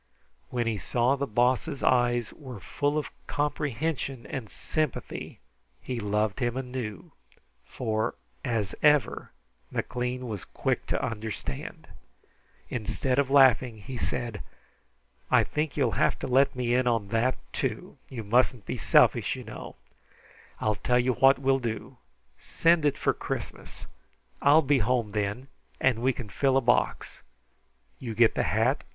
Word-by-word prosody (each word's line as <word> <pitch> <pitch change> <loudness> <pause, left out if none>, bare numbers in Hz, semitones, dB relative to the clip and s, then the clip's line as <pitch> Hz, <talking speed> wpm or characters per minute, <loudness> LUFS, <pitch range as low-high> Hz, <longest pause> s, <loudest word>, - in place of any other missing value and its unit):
When 120 -2 -1
he 110 -3 -1
saw 120 +8 +1
the 140 0 -2
Boss's 125 +4 +1
eyes 120 -2 +2
were 130 -7 -9
full 145 +8 -1
of 150 - -3 0.2
comprehension 145 -3 -2
and 115 -3 -5
sympathy, 155 -4 -3 0.4
he 120 - -4
loved 105 0 0
him 120 -1 -1
anew, 125 -6 -5 0.5
for, 110 -3 -2 0.3
as 110 -5 -1
ever, 150 -2 +3 0.4
McLean 125 0 -3
was 105 -5 -5
quick - - -2
to - - 0
understand. 110 - -5 0.8
Instead 125 +3 -1
of 140 -2 +1
laughing, 130 -4 +5
he 125 +6 -8
said: 115 -2 -3 0.9
"I - - +5
think 150 -1 -2
you'll - - +2
have - - +2
to - - -5
let 135 +2 +3
me 120 -1 0
in 125 0 +2
on 115 -4 +1
that, 115 +4 +1 0.2
too. - - -3
You 120 -4 -6
mustn't 120 +1 +2
be - - -3
selfish, - - +4
you - - -8
know. - - -9 0.8
I'll 110 - +1
tell 125 +5 +1
you 125 +1 +2
what 135 +2 +5
we'll 135 0 +2
do. 120 +2 -5 0.4
Send 165 -2 +2
it 140 -1 +2
for - - +1
Christmas. - - -6 0.6
I'll 150 +3 +6
be 140 0 +3
home 115 -1 +1
then, 105 +5 -2 0.3
and 120 -3 +2
we 130 +2 +3
can 125 -3 -7
fill 135 +3 +2
a - - +6
box. 120 0 0 0.8
You 115 -4 -5
get 115 0 +5
the - - 0
hat. 115 +6 +1
125 Hz, 145 wpm, -28 LUFS, 115-135 Hz, 0.9 s, I'll